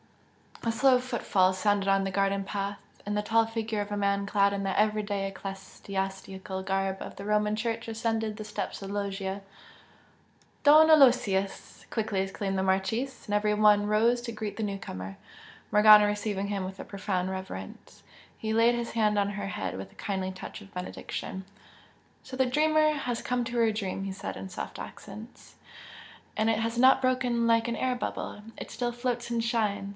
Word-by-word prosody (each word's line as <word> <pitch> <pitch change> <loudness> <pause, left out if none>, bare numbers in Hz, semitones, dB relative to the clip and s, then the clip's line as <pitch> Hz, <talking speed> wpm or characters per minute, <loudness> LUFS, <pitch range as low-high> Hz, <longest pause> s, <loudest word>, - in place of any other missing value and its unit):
A 230 - +1
slow 255 +2 +4
footfall 220 -7 +1
sounded 200 +1 +1
on 195 0 +3
the 195 - -2
garden 195 +1 +1
path, 200 0 -3 0.3
and 205 0 -2
the 210 - 0
tall 225 +1 +3
figure 225 -1 -2
of 205 0 -5
a 205 - -1
man 200 0 0
clad 200 0 +3
in 200 - -2
the 195 0 -1
everyday 210 -2 +1
ecclesiastical 195 0 -5
garb 195 0 -1
of - - -7
the 195 - -8
Roman 210 0 +1
Church 230 +1 -3
ascended 225 -1 -2
the 215 - -5
steps 210 -1 -5
of 195 - -6
the - - -5
loggia. 195 -1 -3 1.2
"Don 305 +2 +8
Aloysius!" 240 -10 +3
quickly 210 -4 -1
exclaimed 195 0 -2
the - - +1
Marchese, 190 +8 -1
and 205 - -4
every 210 0 +2
one 210 -1 +5
rose 230 +3 +3
to 240 -1 -5
greet 215 -2 -5
the 225 - -2
newcomer, 95 - -5 0.5
Morgana 210 0 +8
receiving 205 -1 -1
him 200 -2 -2
with 190 +1 -7
a - - -5
profound 190 -2 -2
reverence. 190 - -8 0.3
He 220 0 -2
laid 230 +2 +4
his 235 0 -3
hand 215 -2 +2
on 200 0 +1
her 205 -1 -4
head 95 - -4
with 95 0 -8
a - - -22
kindly 190 -2 -3
touch 190 +3 -8
of 200 -1 -15
benediction. 185 +1 -5 0.8
"So 260 - -9
the 260 - +3
dreamer 310 +3 +3
has 250 -5 -3
come 250 0 0
to 235 +1 -4
her 230 -1 +4
dream!" 195 -3 -3
he 195 - -3
said, 190 - -6
in 190 - -7
soft 180 - -6
accents 215 +4 -10 0.8
"And 220 +1 +3
it 220 - 0
has 230 +1 -2
not 260 +2 +6
broken 250 -2 +1
like 230 0 +3
an 235 - -1
air 255 +1 0
bubble! 210 -3 -5
it - - -7
still 240 -1 -2
floats 240 0 -3
and 230 -1 0
shines!" 215 -4 0
210 Hz, 185 wpm, -28 LUFS, 195-230 Hz, 1.2 s, Don